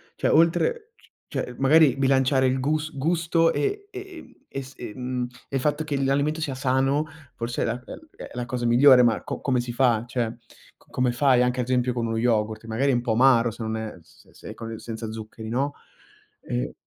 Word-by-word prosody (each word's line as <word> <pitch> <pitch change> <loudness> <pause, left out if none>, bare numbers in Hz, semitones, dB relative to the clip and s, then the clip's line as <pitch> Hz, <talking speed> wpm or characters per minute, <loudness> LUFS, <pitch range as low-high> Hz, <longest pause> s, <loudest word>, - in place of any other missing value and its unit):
Cioè - - 0
oltre 440 - +2
c - - -24 0.3
cioè 125 - -3
magari 145 0 +5
bilanciare 135 0 +3
il 130 +1 0
gus 155 +3 -1
gusto 165 +2 +2
e 405 0 -2
ehm, 385 -3 -10 0.2
e 135 - -4
s 130 +1 -13
e 115 -4 -7
mhmm, 125 -1 -3 0.2
e - - -5
il 135 - 0
fatto 150 +3 0
che 145 -3 -2
l'alimento 140 +4 +1
sia 140 -4 -2
sano 135 +3 +1 0.3
forse 120 +1 -3
è - - +1
la - - 0
è - - -12
l 315 - -13
è - - -10
è - - -13
la 120 0 -4
cosa 120 0 -3
migliore, 125 +1 +7
ma 115 -2 +2
co - - -5
come 130 -3 0
si 120 0 -5
fa? 120 -3 +2
Cioè, 120 -2 -2 0.4
co - - -28
come 125 -1 0
fai 125 0 +3
anche 125 0 0
ad 125 - -4
esempio 125 -1 +1
con 115 -2 -2
uno 115 0 -2
yogurt? 110 -1 0
Magari 115 +5 0
è - - +1
un 120 - 0
po' 120 - -2
amaro 120 0 +4
se 115 - -11
non 110 0 -2
è 110 -1 -6
s - - -23
se - - -12
è - - -6
con 115 -1 -7
senza 115 -1 -6
zuccheri, 110 0 -8
no, 140 +4 -1 0.7
e - - -3
130 Hz, 225 wpm, -25 LUFS, 120-145 Hz, 0.7 s, migliore